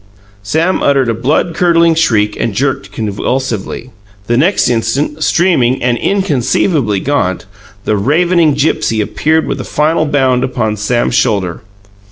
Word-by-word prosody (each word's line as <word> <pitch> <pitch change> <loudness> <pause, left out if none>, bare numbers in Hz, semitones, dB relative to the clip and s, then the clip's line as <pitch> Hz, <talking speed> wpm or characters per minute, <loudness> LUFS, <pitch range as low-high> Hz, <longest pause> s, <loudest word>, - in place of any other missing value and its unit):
Sam 160 - 0
uttered 135 -3 +2
a - - +1
blood 140 +9 0
curdling 170 -1 +3
shriek 105 -10 +1
and 110 -4 -2
jerked 130 -6 -2
convulsively. 115 +3 -3 0.3
The 120 - 0
next 170 +11 +2
instant, 125 +6 -1
streaming 135 -11 +1
and 125 -1 +1
inconceivably 145 - 0
gaunt, 110 -9 -1 0.4
the 110 - +1
ravening 160 - +2
Gipsy 145 -5 0
appeared 155 +10 0
with 135 - -3
a - - -5
final 155 +1 0
bound 130 -3 +1
upon 120 -5 -1
Sam's 120 +4 -1
shoulder. 100 -9 0
130 Hz, 135 wpm, -13 LUFS, 110-155 Hz, 0.4 s, curdling